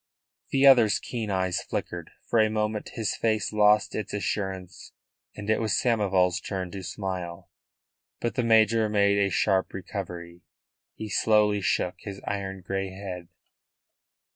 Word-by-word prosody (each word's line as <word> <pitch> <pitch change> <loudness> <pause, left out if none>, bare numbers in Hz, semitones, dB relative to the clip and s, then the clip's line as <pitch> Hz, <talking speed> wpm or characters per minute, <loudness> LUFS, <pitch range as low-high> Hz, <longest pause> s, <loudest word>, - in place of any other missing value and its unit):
The 135 0 +3
other's 120 -6 +7
keen 115 -4 -5
eyes 95 -2 0
flickered. 85 -2 -5 0.2
For 115 - +2
a 110 0 +4
moment 105 0 -2
his 110 -3 -1
face 110 -2 0
lost 105 0 +4
its 105 -1 -4
assurance, 95 -3 -4 0.4
and 105 -1 -7
it 110 +1 +2
was 110 -3 0
Samoval's 100 -7 +2
turn 95 -3 -4
to 95 - -6
smile. 90 -3 -5 0.7
But 120 - -2
the 125 - 0
major 110 -1 +4
made 100 -1 +3
a 100 -1 +2
sharp 95 0 +1
recovery. 90 -3 -7 0.5
He 110 - -6
slowly 105 0 +3
shook 90 -1 0
his 100 -1 -8
iron 95 -1 -4
grey 95 +1 -3
head. 95 -2 -7
100 Hz, 140 wpm, -27 LUFS, 95-110 Hz, 0.7 s, other's